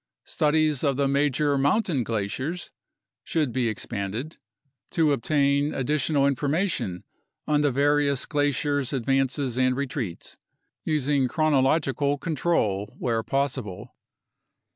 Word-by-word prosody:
Studies 155 -2 +1
of 140 -3 +1
the 140 -1 +2
major 140 +1 +1
mountain 145 - +1
glaciers 115 - -3 0.5
should 150 -7 -1
be 125 -2 +1
expanded, 110 +6 -4 0.5
to 160 -3 +2
ob 135 - -2
tain 140 +2 +1
additional 140 +1 +1
information 140 - -1 0.4
on 150 0 +2
the 145 - +3
various 140 0 +2
glaciers' 145 -1 0
advances 135 0 0
and 130 0 +3
re 140 - 0
treats, 120 - -6 0.4
using 145 -3 +1
chronological 145 -1 +1
control 135 - -1
where 115 -3 0
possible. 130 -7 -3
140 Hz, 110 wpm, -25 LUFS, 130-150 Hz, 0.5 s, the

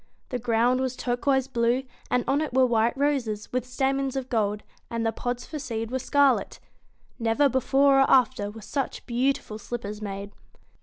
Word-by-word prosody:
The 250 - -2
ground 240 +2 +2
was 260 -1 -1
tur 245 -1 -1
BEAST - - -17
q - - +3
uo 275 - +5
i - - +4
se 265 - -14
blue, 240 +2 +2 0.3
and 250 -1 +2
on 280 +2 +2
it 300 -5 -3
were 260 0 +6
white 235 +1 +1
roses, 260 -8 -1
with 255 0 -1
stamens 270 +1 0
of 260 -1 -3
gold, 210 -3 0 0.3
and 230 0 -2
the 225 - +2
pods 245 +2 -4
for 310 - -6
seed 230 -4 -4
were 260 - -1
scarlet 280 0 +2 0.6
Never 230 +5 +3
before 270 +1 +3
or 270 - +4
after 255 -5 +3
were 220 +2 -10
such 275 +4 -3
beautiful 240 -3 -1
slippers 210 -2 -6
made. 200 -1 -5
250 Hz, 200 wpm, -26 LUFS, 225-270 Hz, 0.6 s, were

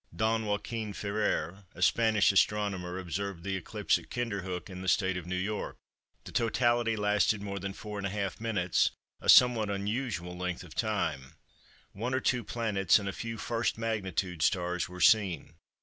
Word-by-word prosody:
Don 110 +3 +1
Joachin 105 +1 -3
Ferrer, 100 -1 -2
a - - -10
Spanish 110 0 +4
astronomer, 100 -3 +1
observed 95 0 -4
the 95 0 -2
eclipse 95 - 0
at - - -16
Kinderhook 95 -7 -3
in 95 -1 -8
the 95 - -6
State 95 0 +2
of 90 -1 -5
New 90 - -2
York. 100 +4 -3 0.5
The - - -10
totality 120 0 +2
lasted 105 0 +2
more 100 -1 -4
than 100 +1 -4
4½ 100 0 -4
m.—a 95 -6 -1
somewhat 120 -4 +7
unusual 100 -3 -2
length 90 0 -3
of 85 -3 -12
time. 85 - -2 0.6
One 120 +6 -2
or - - +2
two 125 -2 +1
planets 105 -4 +2
and 100 -2 -4
a 100 - -2
few 115 -1 -5
1st 115 +2 -1
magnitude 95 -6 -2
stars 90 0 +1
were 90 0 -8
seen. 95 -6 +3
100 Hz, 155 wpm, -30 LUFS, 90-110 Hz, 0.6 s, somewhat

